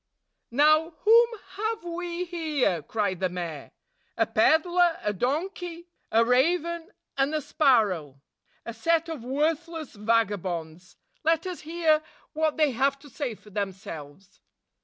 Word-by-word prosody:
"Now, 310 +5 +4
whom 465 +2 +7 0.3
have 440 -1 -2
we 350 +1 -4
here?" 310 - 0
cried 200 +1 -2
the 185 -1 0
mayor. 170 -5 -6 0.5
"A - - +3
peddler, 345 +1 +3
a 210 - 0
donkey, 340 - -3 0.2
a 230 +1 +4
raven, 335 +7 +1 0.3
and 275 +3 +2
a - - +1
sparrow, 205 - +2 0.2
— - - -40
a 230 - -5
set 330 +8 +1
of 310 -8 -5
worthless 310 +4 -2
vagabonds! 185 -6 -1 0.3
Let 325 +2 +2
us 365 -2 -4
hear 315 -1 +2 0.3
what 310 0 0
they 305 -3 +3
have 270 +3 +1
to 280 0 -16
say 250 -4 -3
for 210 - -18
themselves." 190 -3 -7
290 Hz, 135 wpm, -27 LUFS, 210-335 Hz, 0.5 s, whom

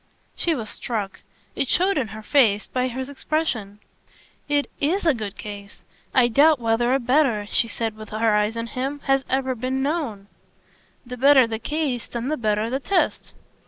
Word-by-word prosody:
She 335 -2 +1
was 220 -5 -5
struck 210 -5 -4 0.4
it 275 - 0
showed 375 +7 +2
in 265 -7 0
her 215 +1 -9
face 215 -6 +3
by 255 0 -1
his 255 +1 -4
expression. 275 -8 -2 0.7
"It 290 -1 +2
IS 345 +7 0
a 320 - +5
good 210 -5 -6
case. 205 -1 -9 0.3
I 255 -2 +4
doubt 290 +6 +5
whether 230 +1 +1
a - - +2
better," 250 -4 +2
she 230 - +2
said 225 -1 -3
with 215 -1 -10
her 220 0 +1
eyes 210 +2 +1
on 230 - -2
him, 265 +5 -4
"has 270 0 +2
ever 265 0 0
been 255 +2 -2
known." 275 -10 -2 0.8
"The 250 +1 -7
better 270 0 +6
the 225 -1 -4
case 285 -2 -2
then 240 +2 -4
the 310 - -1
better 215 -1 0
the 260 +3 -2
test!" 365 +6 -1
250 Hz, 180 wpm, -23 LUFS, 220-280 Hz, 0.8 s, better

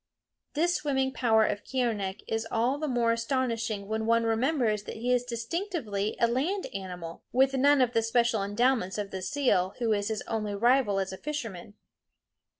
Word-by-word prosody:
This 345 +4 +2
swimming 265 -3 0
power 220 -4 +3
of 205 - -2
Keeonekh 220 -7 -2
is 225 0 -2
all 245 +5 +1
the 310 - -2
more 240 -3 +2
astonishing 230 -4 -1
when 220 +1 -2
one 230 0 +3
remembers 225 -1 +1
that - - -7
he 245 +3 0
is 245 -1 +2
distinctively 235 - -3
a 235 - +4
land 300 +12 -1
animal, 180 -4 -6
with 265 +2 +3
none 280 +1 +4
of 245 -1 +2
the 225 - +3
special 225 -1 +2
endowments 205 0 +1
of 205 -1 -4
the 190 - -5
seal, 195 -6 +1
who 230 -3 +1
is 205 -1 -1
his 220 -1 -2
only 215 -2 -3
rival 240 -1 +3
as 190 0 -2
a - - -6
fisherman. 225 -10 -5
230 Hz, 175 wpm, -28 LUFS, 210-260 Hz, -, a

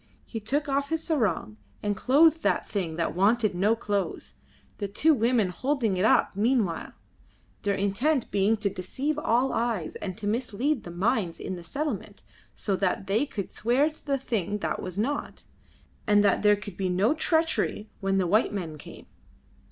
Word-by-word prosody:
He 225 - -5
took 280 +8 -1
off 280 0 0
his 325 0 -1
sarong 210 - 0 0.3
and 205 -1 0
clothed 310 +8 +4
that - - +1
thing 175 -6 -3
that 165 0 -1
wanted 215 +3 +2
no 200 +5 +2
clothes, 205 -4 -3 0.5
the 200 - -2
two 295 +11 +3
women 230 -5 +2
holding 250 0 0
it 185 +3 +1
up 220 - +3
meanwhile, 215 -5 0 0.7
their 200 -2 0
intent 235 +9 0
being 205 +3 +2
to 205 -1 0
deceive 275 +12 -3
all 255 -1 +1
eyes 225 -8 -1
and 185 -2 -5
to 215 - -6
mislead 240 +5 -1
the - - -7
minds 180 0 0
in 190 - -4
the 175 - -9
settlement, 285 - -4 0.3
so 200 - -1
that 190 0 0
they 215 +9 +1
could 205 -8 -5
swear 255 +7 +2
to 310 - -13
the 280 -2 0
thing 210 -6 -2
that - - -3
was 185 0 -6
not, 270 +8 -2 0.6
and 205 -1 +5
that 200 -2 +3
there 210 0 +5
could 205 -2 -9
be 190 -2 -1
no 195 +9 +2
treachery 320 -9 0
when 195 0 0
the 190 - +2
white 210 +6 +3
men 165 -7 -5
came. - - -11
215 Hz, 175 wpm, -27 LUFS, 195-265 Hz, 0.7 s, and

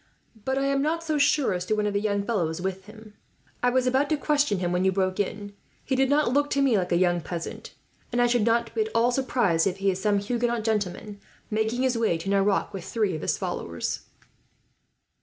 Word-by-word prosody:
"But 265 0 0
I 275 - +1
am 275 0 +1
not 325 +3 -1
so 310 -2 -1
sure 285 -5 +3
as 180 0 -2
to 215 - +1
one 210 0 0
of 205 - -1
the 200 - 0
young 205 -1 0
fellows 180 -8 -1
with 190 +1 -4
them. 215 0 -13 0.5
I 245 - +3
was 255 0 +1
about 265 +3 +2
to 310 - +1
question 290 -7 +1
him, 175 -1 -1
when 180 +1 +1
you 190 - +3
broke 185 0 -1
in. 205 0 -3 0.3
He 265 - 0
did 265 0 +2
not 285 -3 +2
look 290 +1 +2
to 280 - +1
me 260 -5 +3
like 185 -3 0
a 170 - +3
young 175 -1 +2
peasant, 170 0 -7 0.4
and 240 - 0
I 245 - +5
should 240 -1 +2
not 235 +1 +1
be 445 - 0
at 435 - -1
all 235 +2 +3
surprised 240 -10 +1
if 190 0 -2
he 195 0 +1
is 185 0 -5
some 205 0 +2
Huguenot 235 +2 -1
gentleman, 210 -1 -2 0.3
making 220 +4 0
his 250 -3 +1
way 220 -7 +2
to 165 +4 -8
Nerac 200 0 +1
with 190 -3 -6
three 210 -2 0
of 155 - -4
his - - 0
followers." - - -3
215 Hz, 230 wpm, -26 LUFS, 190-260 Hz, 0.5 s, I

